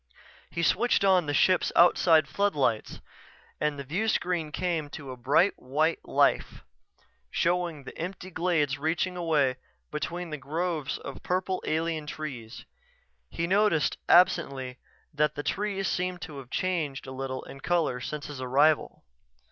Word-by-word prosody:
He 170 - -3
switched 225 +2 +3
on 185 -4 +4
the 145 - -1
ship's 185 -1 +3
outside 165 -3 +5
floodlights 145 - 0 0.6
and 150 -1 0
the 140 - -5
viewscreen 175 0 -1
came 165 -3 -2
to 140 -3 -8
bright 135 +10 +3
white 155 +6 0
life, - - +1 0.7
showing 170 -4 0
the - - -10
empty 185 +2 -6
glades 160 -5 0
reaching 170 +4 -1
away 150 -7 +1 0.3
between 170 +3 -4
groves 155 +1 -2
of - - -8
purple 185 +1 -1
alien 160 -1 -1
trees. 125 -8 -7 0.6
He 165 - -2
noticed, 195 -4 +2
absently, 135 -8 +3 0.3
that 150 0 +1
the 145 - -4
trees 195 +5 -1
seemed 180 -1 -2
to 150 -4 -7
have 130 -2 -11
changed 160 -5 -2
a 130 - -8
little 130 0 -4
in 135 - -11
color 155 -4 0
since 145 +4 -5
his 145 -3 -7
arrival. 140 +4 +2
160 Hz, 135 wpm, -28 LUFS, 140-180 Hz, 0.7 s, outside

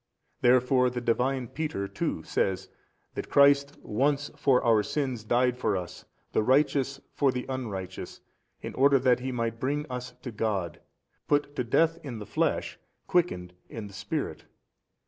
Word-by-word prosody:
Therefore 125 +1 +4
the 125 0 -3
|303 120 - -11
Divine 125 +2 +1
Peter 150 -11 -3
too - - -3
says 95 -1 -1 0.4
that - - -5
Christ 140 0 +5
once 140 +6 0
for 130 -3 +3
our 115 -3 +4
sins 130 -2 -2
died 125 +2 +2
for 105 -5 +1
us, 90 -1 -7 0.3
the - - +2
Righteous 135 +2 +2
for 140 -2 +3
the 125 0 -4
unrighteous, 100 -8 -5 0.4
in - - -5
order 140 +1 +5
that 125 -1 +3
He 130 +1 -3
might 115 -2 -2
bring 145 +4 -1
us 125 0 -5
to 125 - -5
God, 100 -7 -2 0.5
put 145 0 +1
to 125 - 0
death 165 +7 +2
in 130 -6 -6
the 105 - -7
flesh, - - -1 0.3
quickened 90 - 0 0.2
in 110 -2 -6
the 100 - -11
Spirit. 95 - -4
125 Hz, 160 wpm, -28 LUFS, 110-140 Hz, 0.5 s, Christ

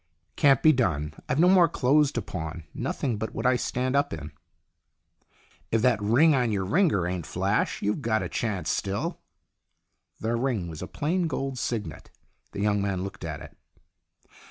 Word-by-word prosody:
" - - -46
Can't 135 -3 +4
be 155 - +8
done. 75 - 0 0.2
I've 130 - +1
no 175 - +6
more 180 -2 +6
clothes 145 +3 +3
to 120 - -2
pawn 80 -1 -6
nothing 125 -6 -2
but 110 +1 -5
what - - -3
I 125 0 +4
stand 130 +2 -1
up 140 - +2
in." 80 -1 -6 1.4
"If 115 0 +1
that 120 -4 +3
ring 125 +10 +4
on 125 -4 +1
your 100 -2 -1
ringer 150 - +2
ain't 90 -2 -3
flash, 95 +4 -1
you've 105 +7 0
got 110 -3 0
a - - -2
chance 95 -8 -2
still." 100 0 -2 1.0
The 115 +2 -1
ring 115 -7 -1
was 80 -2 -8
a 90 - -5
plain 170 +4 -1
gold 135 -3 -3
signet. 115 -4 -4 0.4
The - - -5
young 105 -1 +2
man 95 -2 -1
looked 95 -1 -7
at 75 -3 -5
it. - - -12
110 Hz, 180 wpm, -26 LUFS, 95-135 Hz, 1.4 s, be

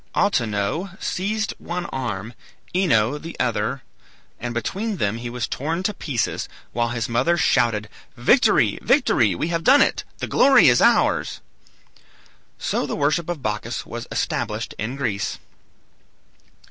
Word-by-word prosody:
Autonoe 120 - 0
seized 215 +3 -2
one 175 0 -4
arm, 115 - -4 0.4
Ino 150 - +2
the 165 +3 -9
other, 120 +2 -1 0.6
and 120 - -4
between 195 - -3
them 105 -4 0
he 120 0 -5
was 120 0 -3
torn 165 +6 -3
to 210 - 0
pieces, 135 - -2 0.2
while 120 0 0
his 115 -2 -2
mother 125 +9 +1
shouted, 110 -9 +2 0.3
"Victory! 240 - +3
Victory! 115 - +3
we 155 - -2
have 165 -1 -1
done 275 +3 +6
it; - - -1
the - - -3
glory 270 - +6
is 120 - +4
ours!" - - +3 1.2
So - - -1
the - - -3
worship 155 +4 0
of 165 -6 -4
Bacchus 110 +1 -3
was 120 +1 -7
established 110 -1 -2
in 115 +5 -3
Greece. 100 - -2
125 Hz, 135 wpm, -22 LUFS, 115-170 Hz, 1.2 s, done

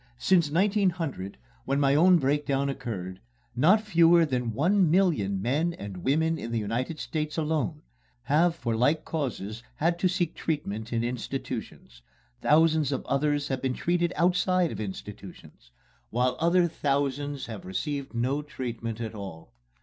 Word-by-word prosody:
Since 170 +5 +3
1900, 175 - 0 0.3
when 135 +1 0
my 140 -1 +3
own 175 +5 +6
breakdown 140 -1 0
occurred, 95 -9 -5 0.4
not 180 - +5
fewer 170 -5 +5
than 125 -5 -1
one 175 - +3
million 150 - +2
men 145 - 0
and 100 -2 -7
women 160 - +1
in 115 - -5
the 115 - 0
United 115 +8 -2
States 150 0 -3
alone 155 0 -1 0.4
have 165 +4 +3
for 115 -8 -2
like 145 +7 +2
causes 115 -8 -4
had 170 +2 0
to 185 - +3
seek 175 -2 -1
treatment 110 -9 -3
in 115 -1 0
institutions, 115 - -5 0.4
thousands 155 -1 +3
of 135 - -3
others 145 +1 0
have 135 -1 -2
been 130 -1 -1
treated 175 0 0
outside 180 +1 +2
of - - -6
institutions, 100 -7 -9 0.4
while 125 +2 +1
other 170 +1 +3
thousands 145 -2 -1
have 110 -4 -8
received 140 - -4
no 130 +5 0
treatment 120 -6 -5
at 115 -2 -4
all. 95 -6 -9
145 Hz, 145 wpm, -27 LUFS, 115-165 Hz, 0.4 s, own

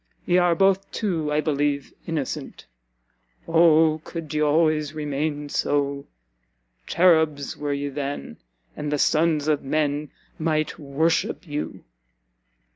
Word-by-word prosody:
Ye 175 +1 +3
are 175 -1 +3
both, 195 +2 +2
too, 165 -8 -2
I 150 +1 +2
believe, 145 -2 -1
innocent 155 -6 -4 0.8
Oh 160 -1 +4
could 165 -4 -7
ye 150 - 0
always 155 0 +2
remain 150 0 -2
so! 140 -1 -1 0.8
Cherubs 160 -5 +3
were 145 -1 -3
ye 140 0 -2
then, 140 - -5 0.4
and 150 0 -4
the 150 - +1
sons 155 0 +2
of 150 -2 +2
men 145 +1 -1 0.3
might 155 0 -1
worship 155 +5 0
you!" 145 0 -5
150 Hz, 120 wpm, -24 LUFS, 145-160 Hz, 0.8 s, Oh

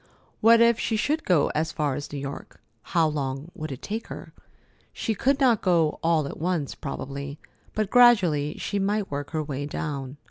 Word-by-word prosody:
What 230 +1 +6
if 235 0 +5
she 225 - 0
should 300 +8 0
go 170 -6 +3
as 160 +2 -1
far 150 -4 -1
as 145 +2 -6
New 145 - -5
York? 140 0 -7 0.2
How 165 -3 +1
long 140 +1 -3
would 155 -1 -6
it 130 - -8
take 220 +2 -4
her? - - -9 0.6
She 225 - -2
could 270 +6 +1
not 245 -6 +4
go 165 -5 +2
all 165 -2 +2
at - - -8
once, 165 -4 -1
probably; 140 0 -6 0.4
but 215 -2 -1
gradually 185 - +5
she 205 - -2
might 200 -1 -1
work 145 0 -4
her 155 -1 -2
way 145 -1 -4
down. 140 -2 -5
160 Hz, 185 wpm, -25 LUFS, 145-210 Hz, 0.6 s, What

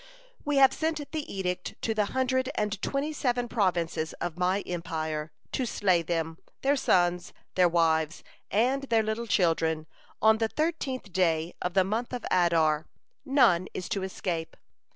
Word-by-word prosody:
We 290 -1 0
have 270 -1 +7
sent 315 -2 -2
the 310 -2 -4
edict 180 -2 -3
to 225 - +1
the 215 -1 +1
hundred 260 +2 0
and 210 -2 -1
twenty 285 +3 -1
seven 245 -4 0
provinces 175 -7 0
of 170 -3 -4
my 180 +3 +1
empire, 160 -3 -4 0.2
to 255 - -1
slay 185 -5 +2
them, 165 -1 -2 0.2
their 280 +2 +3
sons, 175 -8 +1 0.2
their 180 -1 +4
wives, 160 -1 +1 0.3
and 250 +6 +2
their 230 -4 +2
little 220 +2 -2
children, 165 -5 +1 0.3
on 220 0 +5
the 225 - +2
thirteenth 275 - -2
day 165 -2 +1
of 180 0 -2
the 190 - +5
month 220 +6 -2
of 245 - -4
Adar 165 -3 +3 0.4
none 195 - +4
is 180 - -4
to 195 - -1
escape. 175 -3 -4
190 Hz, 155 wpm, -28 LUFS, 170-245 Hz, 0.4 s, have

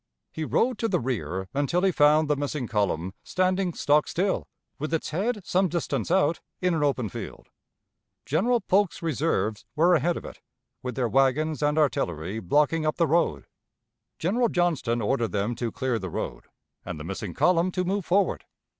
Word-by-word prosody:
He 160 - -4
rode 240 +8 +1
to 225 - +1
the - - +1
rear 100 -7 -3
until 145 +6 0
he 195 - +4
found 150 0 +4
the 150 - +2
missing 145 -1 -3
column 95 -4 -1
standing 185 0 0
stock 150 +1 +3
still, 190 +2 -1 0.3
with 155 +3 -1
its 155 - -3
head 205 +5 -1
some 190 +1 +2
distance 170 0 -2
out 175 -2 +2 0.2
in 180 -1 +1
an 160 - 0
open 135 -5 +1
field. 95 - -8 0.8
General 230 - +2
Polk's 195 -2 +1
reserves 125 - 0
were 170 +3 +4
ahead 170 +2 +2
of - - -8
it, - - -10 0.4
with 125 -2 -5
their 125 -1 0
wagons 135 +5 +2
and 150 +1 +1
artillery 95 - 0
blocking 150 - +2
up 155 0 0
the 170 - +2
road. 160 - +1 0.7
General 230 +8 +1
Johnston 155 - 0
ordered 115 -2 0
them 105 +4 0
to 120 -1 -3
clear 130 -3 -1
the 95 -2 -5
road, - - -5 0.4
and - - -6
the - - -6
missing 95 0 -5
column 180 0 +3
to 185 0 -1
move 195 +2 -1
forward. 195 +4 +1
150 Hz, 175 wpm, -26 LUFS, 120-180 Hz, 0.8 s, he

